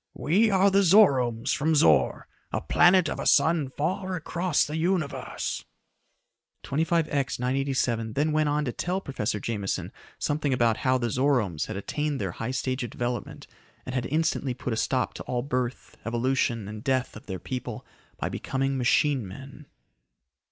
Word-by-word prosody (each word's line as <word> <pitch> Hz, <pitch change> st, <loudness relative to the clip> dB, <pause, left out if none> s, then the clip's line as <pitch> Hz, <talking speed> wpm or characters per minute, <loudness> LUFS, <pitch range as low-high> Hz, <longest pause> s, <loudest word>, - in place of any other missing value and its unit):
"We 205 Hz, +9 st, +2 dB
are 195 Hz, 0 st, +4 dB
the 200 Hz, +1 st, +4 dB
Zoromes 135 Hz, -, +4 dB
from 155 Hz, +2 st, +1 dB
Zor, 75 Hz, -, +3 dB, 0.2 s
a -, -, 0 dB
planet 180 Hz, +1 st, +4 dB
of -, -, -4 dB
a -, -, -2 dB
sun 150 Hz, -1 st, +3 dB
far 185 Hz, +5 st, -1 dB
across 170 Hz, 0 st, 0 dB
the 150 Hz, -, -5 dB
Universe." 170 Hz, -2 st, -2 dB, 1.0 s
25X 150 Hz, -3 st, 0 dB
987 125 Hz, -3 st, 0 dB
then 150 Hz, +5 st, +1 dB
went 155 Hz, -1 st, +2 dB
on 150 Hz, +1 st, 0 dB
to 125 Hz, -, -1 dB
tell 180 Hz, +9 st, -2 dB
Professor 115 Hz, -, -3 dB
Jameson 100 Hz, -2 st, -3 dB, 0.3 s
something 145 Hz, -2 st, 0 dB
about 120 Hz, -3 st, +2 dB
how 130 Hz, 0 st, +2 dB
the 120 Hz, -2 st, -2 dB
Zoromes 125 Hz, -, +1 dB
had -, -, -5 dB
attained 150 Hz, +8 st, -2 dB
their 95 Hz, -4 st, -2 dB
high 115 Hz, +7 st, -5 dB
stage 130 Hz, 0 st, -2 dB
of 120 Hz, -, -4 dB
development 120 Hz, 0 st, -4 dB, 0.4 s
and 130 Hz, -, -5 dB
had 125 Hz, -2 st, -1 dB
instantly 150 Hz, -4 st, 0 dB
put 125 Hz, -, -3 dB
a -, -, -1 dB
stop 125 Hz, +3 st, 0 dB
to -, -, -7 dB
all 120 Hz, -1 st, -2 dB
birth, 125 Hz, -2 st, -3 dB
evolution 120 Hz, -2 st, 0 dB
and 105 Hz, +1 st, -7 dB
death 130 Hz, -2 st, 0 dB
of 110 Hz, -, -12 dB
their 95 Hz, -2 st, -4 dB
people, 125 Hz, +5 st, -6 dB, 0.3 s
by -, -, -2 dB
becoming 135 Hz, 0 st, -2 dB
machine 130 Hz, -1 st, +2 dB
men. 140 Hz, +8 st, -11 dB
135 Hz, 160 wpm, -26 LUFS, 120-155 Hz, 1.0 s, are